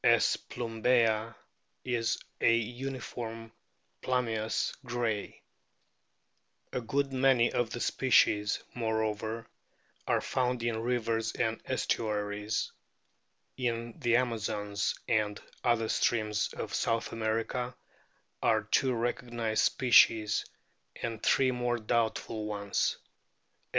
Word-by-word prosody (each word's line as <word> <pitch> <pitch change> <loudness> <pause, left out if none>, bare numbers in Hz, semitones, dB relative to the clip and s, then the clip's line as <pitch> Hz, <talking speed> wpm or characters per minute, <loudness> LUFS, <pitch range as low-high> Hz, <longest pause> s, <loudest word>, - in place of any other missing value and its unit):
S. - - +5
plumbea 115 -1 +1 0.5
is 115 -3 0 0.2
a - - +5
uniform 115 -1 -4 0.5
plumbeous 115 -4 0
grey. 120 -4 -2 1.3
A 125 - -1
good 135 +4 -1
many 130 -2 +4
of 120 -2 +1
the 120 - -5
species, 105 -6 +3
moreover, 110 -1 -2 0.6
are - - +3
found 125 -2 -1
in 115 -1 -1
rivers 115 -2 0
and 110 0 -1
estuaries. 105 -1 -1 0.9
In 120 0 -2
the 120 -5 +3
Amazons 105 -4 0
and 105 -3 +1 0.2
other 115 -2 +2
streams 110 -2 +1
of - - -5
South 115 0 0
America 115 +3 -2 0.7
are - - +3
two 130 -1 +2
recognised 120 -1 0
o - - +5
species, 115 -4 +5 0.6
and 115 -2 -3
three 130 -1 +3
more 120 -1 0
doubtful 110 -1 -1
ones. 100 -1 0
115 Hz, 100 wpm, -30 LUFS, 110-120 Hz, 1.3 s, S